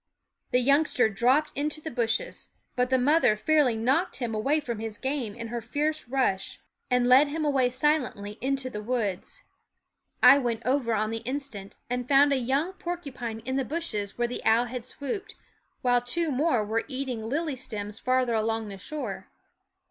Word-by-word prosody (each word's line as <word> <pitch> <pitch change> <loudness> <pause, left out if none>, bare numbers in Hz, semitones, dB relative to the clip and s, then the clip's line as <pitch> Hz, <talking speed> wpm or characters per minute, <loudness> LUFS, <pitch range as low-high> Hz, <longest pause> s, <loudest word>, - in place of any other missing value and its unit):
The - - +3
youngster 275 -3 +3
dropped 250 +9 +2
into 300 +2 -2
the 315 +1 -6
bushes; 230 -2 -1 0.3
but 250 0 +1
the 260 - +3
mother 255 -4 +3
fairly 290 -1 +3
knocked 245 +5 +1
him 240 -3 -3
away 270 +9 +1
from 235 -7 -5
his 220 -1 -5
game 265 -6 -3
in 230 -1 -6
her 240 0 -3
fierce 295 +5 -1
rush, 250 -8 0 0.3
and 250 -1 +3
led 260 +4 +6
him 305 +2 -2
away 270 -4 +2
silently 250 -6 -1
into 270 0 -1
the 210 -4 -5
woods. 225 - -3 0.8
I 280 - +9
went 235 -3 -2
over 250 -3 +1
on 215 +1 0
the 225 - -2
instant, 230 -4 -5
and 250 0 -3
found 280 +1 +5
a - - +2
young 275 +8 0
porcupine 270 -12 -5
in 260 +3 -2
the 270 - +1
bushes 245 -10 -4
where 240 0 +1
the 245 - -6
owl 225 +2 +4
had 245 0 -6
swooped, 380 +12 -5 0.5
while 245 -1 +3
two 310 +7 0
more 255 -5 +1
were 225 +2 -1
eating 255 -5 -4
lily 305 +1 -1
stems 210 -4 -6
farther 255 -2 +1
along 225 0 -1
the 195 -1 -8
shore. 305 +9 -5
250 Hz, 175 wpm, -27 LUFS, 225-285 Hz, 0.8 s, I